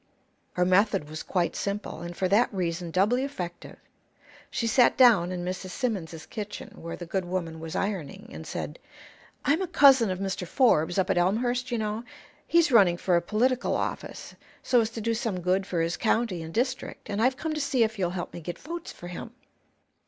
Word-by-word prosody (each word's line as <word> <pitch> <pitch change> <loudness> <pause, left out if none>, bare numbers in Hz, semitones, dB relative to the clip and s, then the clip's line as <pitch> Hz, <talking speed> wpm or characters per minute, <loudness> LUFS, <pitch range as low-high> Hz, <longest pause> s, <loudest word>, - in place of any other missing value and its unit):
Her 180 - +2
method 190 -2 +3
was 155 +1 -6
quite 175 -3 -1
simple, 200 -4 -3
and 175 0 -7
for 185 - +1
that 205 +6 +3
reason 175 -3 -2
doubly 210 +9 +2
effective. 180 -11 -6 0.7
She 230 - -2
sat 235 +2 +4
down 215 -9 +6
in 180 -1 -4
Mrs. 185 +1 -4
Simmons's 180 -8 -3
kitchen, 210 -1 -7
where 165 0 -5
the 175 - -8
good 190 +3 -1
woman 175 -3 -3
was 160 0 -6
ironing, 195 +1 -3
and - - -8
said: - - -5 0.7
"I'm 315 +6 +3
a 375 - -1
cousin 275 - +6
of 185 - -1
Mr. 190 -2 -3
Forbes, 175 - +3
up 190 - +2
at 175 - +2
Elmhurst, 240 +7 +1
you 240 - -1
know. 215 +1 -2 0.4
He's 335 -3 +4
running 190 -7 +6
for 180 0 +1
a 170 - +3
political 240 +8 +1
office, - - -4 0.3
so 250 -2 +4
as 220 - -1
to 230 -1 -6
do 230 +2 0
some 225 -5 -2
good 185 +2 0
for 170 -2 0
his 165 +1 -1
county 225 -6 +1
and 160 0 -7
district, 255 +6 -2
and 205 +1 -2
I've 255 +2 +3
come 315 +2 -2
to 305 - -2
see 275 -4 +2
if 220 -1 -2
you'll 180 -2 +1
help 175 0 -5
me 170 - -7
get 175 +2 -5
votes 340 +1 -7
for 175 - -10
him." 180 - -7
200 Hz, 200 wpm, -27 LUFS, 175-240 Hz, 0.7 s, down